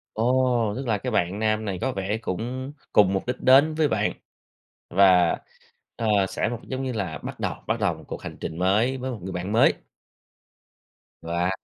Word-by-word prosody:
Ồ, 120 -2 +2
tức 135 +1 -4
là 110 -3 +1
cái 125 +5 -4
bạn 95 -3 0
nam 110 0 0
này 95 -3 -3
có 130 +3 -1
vẻ 100 0 -2
cũng 125 +7 -4 0.2
cùng 100 -2 +5
mục 95 - -2
đích 125 0 -3
đến 140 +4 +5
với 155 -1 +2
bạn, - - 0 0.8
và, 90 -2 +5 0.6
ờ, 115 - -2 0.2
sẽ - - -1
một 120 0 -5
giống 130 0 -3
như 130 - -2
là, 95 -8 -3
bắt - - -8
đầu - - -1
bắt - - -1
đầu - - +1
một - - -14
cuộc - - -6
hành - - -7
trình 80 - -5
mới 105 +8 +2
với 130 +1 -4
một 120 - -5
người 95 +1 -5
bạn 90 +3 -4
mới. 110 - +5 1.5
Và 85 +2 -1
110 Hz, 195 wpm, -25 LUFS, 95-130 Hz, 1.5 s, cùng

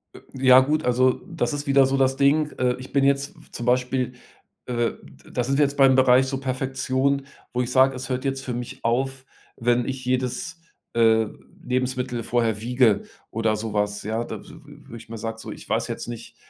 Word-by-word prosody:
Äh. - - -12
Ja 130 -1 +7
gut, 150 +3 0
also 125 +1 +2
das 170 -3 -2
ist 145 0 -4
wieder 135 -1 +5
so 135 +1 0
das 135 0 +2
Ding. 150 +2 +3
Äh, 125 -1 +2
ich 130 - -10
bin 140 -1 +3
jetzt 140 +1 +1
w - - -16
zum 120 - -6
Beispiel 125 0 +1 0.5
äh, 120 -1 0 0.4
da 125 - -1
sind 135 +2 0
wir 145 - +5
jetzt 140 +1 -4
beim 135 -1 +6
Bereich 130 0 +5
so 135 0 -3
Perfektion, 130 +1 -1 0.3
wo 125 - +1
ich 125 0 -3
sage: 130 0 +4
„Es 130 +1 -6
hört 130 +1 -2
jetzt 135 0 -2
für 125 - -4
mich 120 0 -6
auf, 130 +3 -1 0.3
wenn 120 +1 +1
ich 130 -1 -4
jedes, 130 +6 -2 0.4
äh, 110 -1 +4 0.4
Lebensmittel 125 -1 -2
vorher 115 -3 0
wiege 120 -3 +3 0.3
oder 110 -1 +1
so 110 0 -4
was,“ 105 0 -1
ja. 110 +2 -2
Da - - -7
w - - -17
w 150 -2 -14
würde 115 - -9
ich 110 - -13
mir 115 - -6
sagt 115 +1 -5
so: - - -7
„Ich - - -11
weiß - - 0
jetzt - - -5
nicht, 120 -1 -8
130 Hz, 210 wpm, -24 LUFS, 120-135 Hz, 0.5 s, Ja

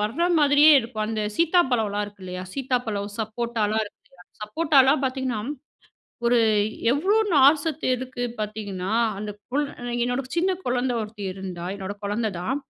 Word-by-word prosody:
வர்ற 225 +11 -1 0.2
மாதிரியே 290 +1 +6
இருக்கும். 225 -2 -4
அந்த 220 -1 -2 0.2
சீத்தாப்பழம்லாம் 245 - +2
இருக்கு 205 -2 -12
இல்லயா! 180 0 -5
சீத்தாப்பழம், 245 -6 -2
சப்போட்டாலாம் 220 -1 -1
இருக்கு 205 - -16
இல்லயா! 180 0 -19 0.2
சப்போட்டாலாம் 275 +3 +3
பார்த்தீங்கன்னா, 260 -4 -2 0.8
ஒரு 240 0 +4 0.5
எவ்ளோ 380 +10 +2 0.2
நார்சத்து 290 +3 +4
இருக்கு 255 0 -6 0.2
பார்த்தீங்கன்னா, 205 -3 -4 0.3
அந்த 210 0 -5 0.2
கொள் 290 +3 +1 0.4
என்னோட 245 +2 0
சின்ன 365 +3 +2 0.2
குழந்த 250 0 0
ஒருத்தி 210 -1 -6
இருந்தா! 185 -3 -6
என்னோட 195 +1 -5
குழந்த 215 +2 -1
தான். 265 +10 -1
235 Hz, 130 wpm, -24 LUFS, 210-270 Hz, 0.8 s, மாதிரியே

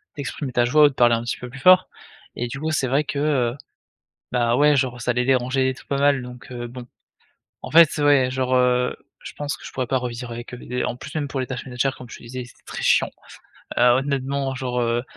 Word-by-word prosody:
d'exprimer 140 -1 -5
ta 120 -1 +2
joie 150 +5 +4
ou - - +6
de - - -10
parler 120 -2 +4
un 115 - -3
petit 120 - -3
peu 125 - -8
plus 130 - -11
fort 185 +5 +6 0.5
et 120 - -2
du 140 +4 -6
coup 155 +2 -2
c'est 155 -4 0
vrai 140 +4 +2
que, 145 - -5
heu, 140 -4 +1 0.7
bah, 120 -1 +2
ouais, 150 0 +5
genre, 130 -2 0
ça 125 +1 0
les 125 +1 +1
dérangeait 130 +1 +1
et - - -2
tout 120 - -15
pas 140 - -2
mal 140 -2 +3
donc, 125 0 -11
heu, 120 -1 -5
bon, 125 0 -10 0.8
en - - -7
fait, 165 -1 +8
ouais, 145 -3 +4
genre, 130 0 0
heu, 125 0 +2 0.3
je - - -8
pense 145 -1 -4
que - - -13
je - - -8
pourrais 130 -2 -3
pas 130 - +1
revivre 125 -1 -5
avec 120 +1 -8
eux, - - -6
des 125 +1 -4
en - - -2
plus, 125 - -10
même 150 -2 -1
pour 135 0 -4
les 130 - -2
tâches 125 -2 -5
ménagères 130 +1 -1
comme 125 - -11
je - - -8
te - - -18
disais 125 +2 -6
ils - - -5
étaient 120 - -19
très - - -6
chiant. - - +3 0.7
Heu, - - +1
honnêtement, 135 +2 +1
genre, 125 -2 -3
heu, 120 0 0
130 Hz, 255 wpm, -22 LUFS, 125-140 Hz, 0.8 s, fait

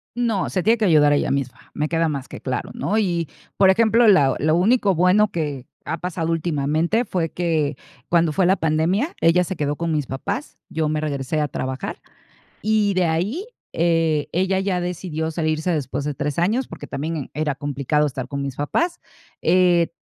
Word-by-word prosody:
No, 235 -5 0
se 185 - -1
tiene 225 +6 +3
que 220 - -2
ayudar 150 -5 +5
ella 145 - +1
misma, 135 -2 -4
me 150 +1 -1
queda 165 0 +1
más 140 -3 -4
que - - -10
claro, 130 -2 -3
¿no?, 215 - -1
y, 175 -7 0 0.3
por 195 -1 +5
ejemplo, 230 +4 +4
la 140 -9 +5
lo 155 +2 +2
único 200 +2 +3
bueno 185 +5 +4
que 145 -7 -3 0.2
ha 160 +3 -2
pasado 165 -2 -2
últimamente 165 - 0
fue 175 -5 -1
que, 160 -4 -1 0.3
cuando 170 -2 +3
fue 185 +3 +2
la 190 +2 +3
pandemia, 165 - 0
ella 180 +2 +4
se 190 - -4
quedó 145 -2 -2
con 170 -1 -1
mis 150 -4 -1
papás, 190 - -4
yo 155 -1 -1
me 155 0 0
regresé 145 0 -2
a 150 - +1
trabajar 130 -1 -4 0.6
y 215 -1 +2
de 185 -1 +2
ahí, 190 - -1 0.3
eh, 165 -3 +1
ella 190 +2 +1
ya 190 -2 0
decidió 170 -3 -3
salirse 155 +1 -1
después 140 -3 -2
de 150 0 -2
3 145 +1 -3
años, 220 +10 +1
porque - - -9
también 150 +1 -4
era 150 -1 -1
complicado 145 +1 0
estar 130 -2 -4
con 140 -1 -4
mis 135 -2 -4
papás, 335 - -1 0.4
eh, 175 -1 +4
165 Hz, 185 wpm, -22 LUFS, 150-185 Hz, 0.6 s, ayudar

